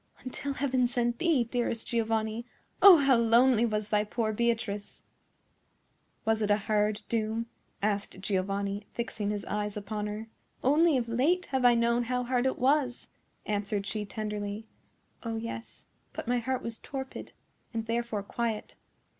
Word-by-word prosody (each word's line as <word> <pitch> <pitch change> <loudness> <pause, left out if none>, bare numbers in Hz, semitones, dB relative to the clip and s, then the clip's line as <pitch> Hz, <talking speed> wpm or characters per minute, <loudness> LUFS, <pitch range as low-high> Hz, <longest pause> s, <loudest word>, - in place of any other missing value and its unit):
Until 275 +2 -4
Heaven 260 -2 +1
sent 240 -1 -1
thee, 325 -8 +3
dearest 235 -1 -2
Giovanni, 225 -1 0 0.4
oh, 390 -4 +11
how 275 -3 +4
lonely 235 +1 +5
was 210 -1 -2
thy 210 0 +3
poor 220 +1 -1
Beatrice!" 225 -2 -2 1.2
"Was 220 0 +2
it 210 - +1
a 205 - +5
hard 210 0 0
doom?" 225 0 -1 0.4
asked 205 -2 -1
Giovanni, 200 +1 -1
fixing 225 -3 -2
his 205 -1 -3
eyes 210 0 -2
upon 210 +1 -3
her. 210 +2 -5 0.4
"Only 300 +3 +4
of 240 -2 -1
late 285 +11 +2
have 260 -2 +1
I 240 -1 +7
known 235 +1 +2
how 250 +1 0
hard 250 +1 +1
it 260 - -1
was," 260 -1 +1 0.4
answered 205 -1 -1
she, 210 +1 -2
tenderly. 210 0 -4 0.6
"Oh, 230 -1 -3
yes; 230 +1 -6 0.3
but - - -6
my 245 0 +2
heart 255 +2 -2
was 230 -1 -5
torpid, 265 -1 -6 0.4
and 225 -1 -3
therefore 230 -2 -2
quiet." 225 +1 -3
230 Hz, 150 wpm, -29 LUFS, 210-245 Hz, 1.2 s, oh